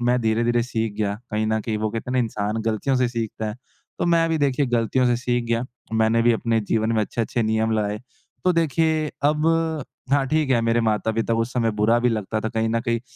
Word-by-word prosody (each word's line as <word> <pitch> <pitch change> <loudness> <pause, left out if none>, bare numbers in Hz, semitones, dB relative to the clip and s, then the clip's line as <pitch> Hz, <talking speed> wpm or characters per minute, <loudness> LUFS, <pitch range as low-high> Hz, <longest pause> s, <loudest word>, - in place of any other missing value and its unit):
मैं 125 +1 +2
धीरे-धीरे 115 +1 +1
सीख 115 -3 -2
गया, 100 -1 0 0.2
कहीं 110 +1 0
न 110 0 +1
कहीं 110 0 -2
वो 110 0 0
कहते 115 +2 -5
हैं - - -2
ना 130 - +1
इंसान 110 -2 -1
गलतियों 115 +4 0
से 125 -1 +2
सीखता 115 -2 -4
है, 105 - -4 0.4
तो - - 0
मैं 165 -1 +3
भी 160 -1 0
देखिए 140 -1 +1
गलतियों 120 +1 +1
से 120 -1 +2
सीख 120 -1 -1
गया, 115 +1 0 0.3
मैंने 110 +1 +3
भी 120 0 +4
अपने 115 0 0
जीवन 110 +2 0
में 110 - +2
अच्छे-अच्छे 115 +2 -2
नियम 110 +1 +1
लाए, 105 -1 -1 0.5
तो 180 - +4
देखिए 160 -1 +1 0.2
अब 150 +2 +2 0.7
हाँ, 140 -1 +4
ठीक 155 -2 +1
है, 120 -3 +4
मेरे 115 +1 +2
माता-पिता 110 +1 0
को 115 - +1
उस 115 +2 -2
समय 115 -2 +1
बुरा 115 +3 +4
भी 125 +1 +2
लगता 110 -1 -2
था 110 - -2
कहीं 110 0 -1
न 115 0 0
कहीं, 115 0 -1
115 Hz, 230 wpm, -23 LUFS, 110-125 Hz, 0.7 s, भी